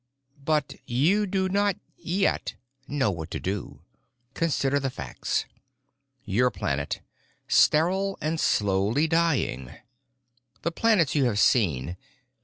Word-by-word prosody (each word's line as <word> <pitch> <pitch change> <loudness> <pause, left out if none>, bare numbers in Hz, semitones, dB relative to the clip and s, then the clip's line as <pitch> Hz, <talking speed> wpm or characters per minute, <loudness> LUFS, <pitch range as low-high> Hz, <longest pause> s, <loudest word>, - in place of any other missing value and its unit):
But 150 -1 0
you 175 +13 +2
do 190 0 0
not—yet—know 145 - -2
that 80 - -6
you - - -2
do. 95 -8 -4 0.5
Consider 145 -3 +1
the 135 -1 -1
facts: 70 - -3 0.8
"Your 120 +6 +2
planet. 70 - -3 0.5
Sterile 190 +5 +3
and 155 +1 -2
slowly 105 +9 +2
dying. 155 - 0 0.9
"The 170 - 0
planets 190 -5 +2
you 140 -3 +2
have 115 -5 0
seen. 85 - +2
140 Hz, 100 wpm, -26 LUFS, 100-170 Hz, 0.9 s, Sterile